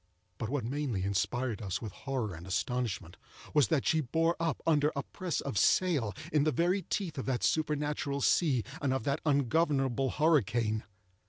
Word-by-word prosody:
But 110 - -3
what 140 -2 -1
mainly 130 -6 -2
inspired 110 +4 -1
us 95 -4 -2
with 110 -4 -6
horror 125 -4 -3
and 85 +2 -9
astonishment, 100 -3 -2 0.4
was 150 -3 +5
that 155 -5 +1
she 160 - +3
bore 165 +5 +1
up 165 -4 -1
under 150 -2 +3
a 140 - -2
press 180 -3 -3
of 130 -9 -1
sail 150 - +2 0.2
in 150 -2 +4
the 155 - +2
very 175 +8 +1
teeth 175 -4 -3
of 130 - -5
that 130 -2 -1
supernatural 150 -2 0
sea, 135 -6 +3 0.2
and 135 -2 +1
of 130 - -2
that 140 +1 -1
ungovernable 135 -2 +2
hurricane. 120 - +2
140 Hz, 170 wpm, -31 LUFS, 120-155 Hz, 0.4 s, was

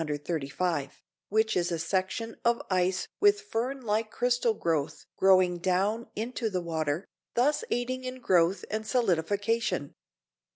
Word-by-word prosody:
135, 150 0 -2 0.3
which 220 +1 +2
is 175 -1 +1
a 170 - 0
section 190 +6 -2
of 235 0 +3
ice 185 0 +1
with 410 0 +5
fern 270 - -3
like 215 -1 0
crystal 240 -1 +1
growth 160 -7 -1
growing 185 -2 +4
down 195 +6 0
into 230 +1 -2
the 185 -3 -1
water, 160 0 -1 0.3
thus 290 - +2
aiding 255 +2 -1
in 255 0 -5
growth 185 -4 +2
and 215 0 -3
solidification. 205 - 0
200 Hz, 130 wpm, -29 LUFS, 175-235 Hz, 0.3 s, with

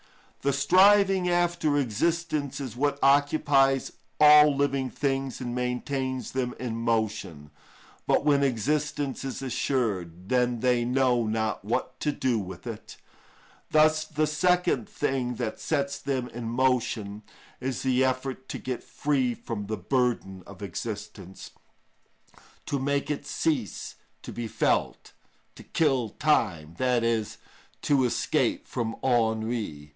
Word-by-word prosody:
The 140 - +1
striving 190 +5 +5
after 175 -4 +1
existence 145 +4 -1
is 130 -5 -6
what 140 +2 0
occupies 140 -1 +3 0.3
all 150 -1 +8
living 140 -2 0
things 135 -1 -2
and 120 -2 -4
maintains 130 +1 -2
them 125 -2 -2
in 120 -3 -3
motion. 110 -10 -2 0.6
But - - +2
when 145 -2 +4
existence 140 +2 -1
is 135 0 -5
assured, 100 -10 -2
then 125 -2 +1
they 125 -1 +2
know 125 -2 +2
not 110 -2 -1
what 110 +4 -2
to 150 - 0
do 130 -5 0
with 95 -4 -8
it; - - -8 0.7
thus 155 0 +4
the 155 0 -1
second 170 -4 +1
thing 130 -4 -1
that 110 - -4
sets 140 -3 -1
them 130 -3 -2
in 120 0 -7
motion 115 -4 0 0.4
is 130 -1 -3
the 130 0 +2
effort 130 0 -2
to - - -4
get 130 -2 -4
free 135 -5 0
from 105 -4 -6
the 110 0 -3
burden 100 -3 -1
of 100 0 -11
existence, 100 -1 -7 1.1
to 140 - -2
make 140 +2 -1
it 145 - -4
cease 145 -10 -2 0.3
to - - -7
be 120 -1 -4
felt, - - -1 0.4
"to - - -13
kill 135 -8 +1
time," 90 - 0
i.e., 115 -3 +1 0.6
to 135 -3 +3
escape 120 - 0
from 115 -1 -3
ennui. 110 - 0
130 Hz, 130 wpm, -27 LUFS, 115-145 Hz, 1.1 s, all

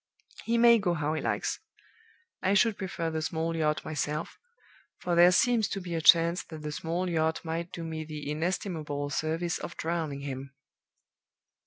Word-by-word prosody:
He 235 +1 +1
may 235 0 +7
go 180 -4 0
how 150 -1 -1
he 155 - -2
likes. - - -1 0.8
I 190 +2 +2
should 220 +1 +4
prefer 180 -4 -3
the 160 0 -2
small 165 +1 -2
yacht 155 -1 0
myself; 150 +1 -3 0.6
for 175 - -2
there 175 +1 +7
seems 235 +2 +3
to 195 - -3
be 180 -2 -6
a 165 - -1
chance 170 +2 +6
that 160 -2 -9
the 150 - -3
small 170 +4 -2
yacht 160 -2 0
might 165 +2 -3
do 170 - -6
me 160 -1 -4
the 150 -2 -6
inestimable 155 -3 -2
service 160 +3 -1
of 170 - -7
drowning 160 -4 -2
him...." 135 0 -6
165 Hz, 170 wpm, -29 LUFS, 155-180 Hz, 0.8 s, may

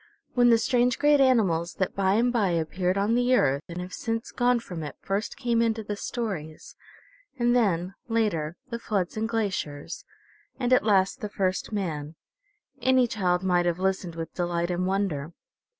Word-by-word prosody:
When 245 -1 +5
the 230 - +6
strange, 245 +1 +2
great 295 -1 +4
animals 195 -10 +2
that 190 - -1
by 195 0 +2
and 240 +2 +2
by 210 -6 +2
appeared 180 +3 0
on 205 +3 +1
the 245 +1 +3
Earth 140 - +2
and 170 +1 -6
have 180 0 -7
since 230 0 -3
gone 245 0 +2
from 180 -7 -7
it 150 - -6
first 200 +2 -3
came 235 -1 +1
into 225 -1 0
the 205 0 -4
stories, 195 -9 -5 0.6
and 240 0 +2
then, 185 -6 +1
later, 195 -9 0
the 235 - -3
floods 195 -6 -2
and 220 +1 -2
glaciers, 200 - -3 0.6
and 250 -1 +2
at 255 - +5
last 205 +3 +2
the 210 - -3
first 190 -1 -1
man, 160 -7 -3 0.7
any 260 0 +4
child 185 -6 0
might 175 -2 +2
have 170 -1 0
listened 185 -2 -1
with 165 -1 -6
delight 175 0 -1
and 180 +1 -1
wonder. 180 -6 -1
195 Hz, 175 wpm, -26 LUFS, 175-235 Hz, 0.7 s, the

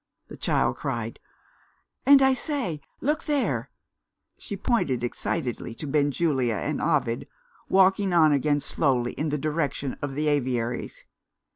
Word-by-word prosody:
the - - -8
child - - 0
cried. - - -4 0.9
"And, 275 -1 +8
I 265 0 +5
say, 255 - -2 0.2
look 300 +4 0
there!" 295 -3 0 0.7
She 200 - -6
pointed 140 - 0
excitedly 120 -1 -3
to 155 - -6
Benjulia 140 -4 +1
and - - -2
Ovid, 115 +1 0 0.4
walking 190 +1 +4
on 160 -3 +5
again 145 +1 +2
slowly 125 -6 0
in 155 - -2
the 150 - 0
direction 150 -2 -2
of 145 -2 -4
the 150 +1 0
aviaries. 125 -5 -1
150 Hz, 130 wpm, -26 LUFS, 130-190 Hz, 0.9 s, And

